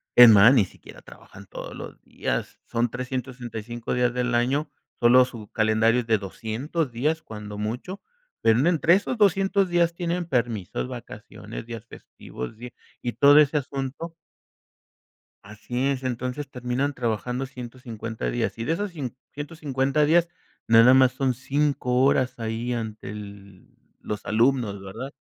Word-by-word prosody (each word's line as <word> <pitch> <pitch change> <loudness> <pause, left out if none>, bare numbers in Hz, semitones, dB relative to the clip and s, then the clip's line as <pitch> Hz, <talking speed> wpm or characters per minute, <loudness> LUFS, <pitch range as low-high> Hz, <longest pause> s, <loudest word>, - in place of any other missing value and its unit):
es 120 -1 +11
más, 110 +3 +8
ni 120 -6 +5
siquiera - - -15
trabajan 100 0 -14
todos - - -8
los - - -9
días, - - -4
son 120 0 0
365 120 -3 -5
días 125 -1 +2
del 125 -1 0
año, 135 +6 +1 0.3
solo 125 +1 +6
su 115 -4 -10
calendario 110 +2 +3
es - - -10
de 110 -2 +3
200 120 - -3
días 150 +7 -1
cuando 105 -1 -8
mucho, 120 - -4 0.4
pero 115 +1 +4
en 145 - +3
entre 170 -1 +4
esos 205 +6 +1
200 195 -1 +3
días 170 -1 +2
tienen 175 0 -2
permisos, 115 - -2
vacaciones, - - -9
días 115 -1 -8
festivos, 65 - -9
y 125 0 -7 0.3
y 120 - -3
todo 145 +5 +7
ese 150 0 +4
asunto. 140 +4 -4 1.3
Así 115 +6 -3
es, 135 -1 -2
entonces 125 +3 -3
terminan 125 +3 -2
trabajando 125 +1 -2
150 120 -3 -6
días, 120 -1 -2
y - - -2
de 160 - 0
esos 205 +3 -3
cin 135 -8 -6 0.2
ciento 150 +3 -7
cincuenta 140 -1 +1
días, 170 +3 +4 0.4
nada 115 +2 +7
más 130 -1 +5
son 130 -1 0
5 130 -1 0
horas 130 -2 +2
ahí 115 +2 -2
ante 110 -2 -5
el 100 -2 -10 0.3
los 105 0 -5
alumnos, 115 -2 +1
¿verdad?, 100 +8 -7
125 Hz, 150 wpm, -25 LUFS, 115-140 Hz, 1.3 s, es